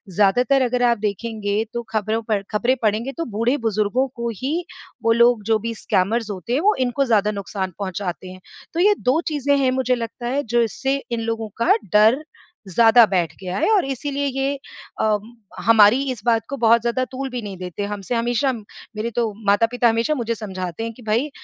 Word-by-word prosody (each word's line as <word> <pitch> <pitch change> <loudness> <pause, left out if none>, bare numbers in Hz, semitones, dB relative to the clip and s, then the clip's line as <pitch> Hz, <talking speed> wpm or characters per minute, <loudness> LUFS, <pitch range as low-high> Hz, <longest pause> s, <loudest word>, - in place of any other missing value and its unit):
ज़्यादातर 245 +7 +3
अगर 250 0 +1
आप 235 -1 +3
देखेंगे, 210 0 -2
तो 235 - -2
खबरों 220 +1 -1
पर 215 -3 0
खबरें 240 +4 +2
पढ़ेंगे, 220 +5 0
तो 330 - -4
बूढ़-बुज़ुर्गों 230 +1 0
को 235 -1 -3
ही 310 - -2 0.4
वो 230 - +3
लोग, 235 -1 +4
जो 220 +1 +2
भी 230 +2 -4
स्कैमर्स 215 +3 0
होते 190 +4 -5
हैं, 265 - +2
वो 420 +2 +3
इनको 255 +2 +1
ज़्यादा 210 -3 +2
नुकसान 195 -1 -4
पहुँचाते 185 -1 -4
हैं। 185 - -11 0.3
तो 335 - -2
ये 415 +3 +5
2 255 +5 +2
चीज़ें 285 -2 +1
हैं, 265 -2 +2
मुझे 255 -1 +1
लगता 235 0 -5
है, 280 +4 -1
जिससे 240 +3 +1 0.2
इन 235 - -1
लोगों 225 -1 -3
का - - +4 0.2
डर 220 +7 +5 0.5
ज़्यादा 225 +4 +6
बैठ 170 -4 0
गया 185 0 -4
है - - +1
और 380 - +2
इसीलिए 280 +1 -3
ये 270 +1 -1 0.5
अम, 215 +1 0 0.3
हमारी 225 +2 +6
इस 240 - -7
बात 230 -3 +2
को 275 - -4
बहुत 230 -1 +4
ज़्यादा 240 +2 0
तूल 265 +1 -4
भी 245 -1 -4
नहीं 200 -3 -7
देते। 180 +2 -5
हमसे 200 +4 -4
हमेशा 240 +3 +1
मेरे 220 0 -7
तो 230 -3 0 0.2
माता-पिता 230 +4 +3
हमेशा 230 +7 +1
मुझे 235 -3 -2
समझाते 185 -2 -5
हैं 230 0 -4
कि, 250 - -16
"भई, 230 +7 0
230 Hz, 190 wpm, -21 LUFS, 210-255 Hz, 0.5 s, ज़्यादा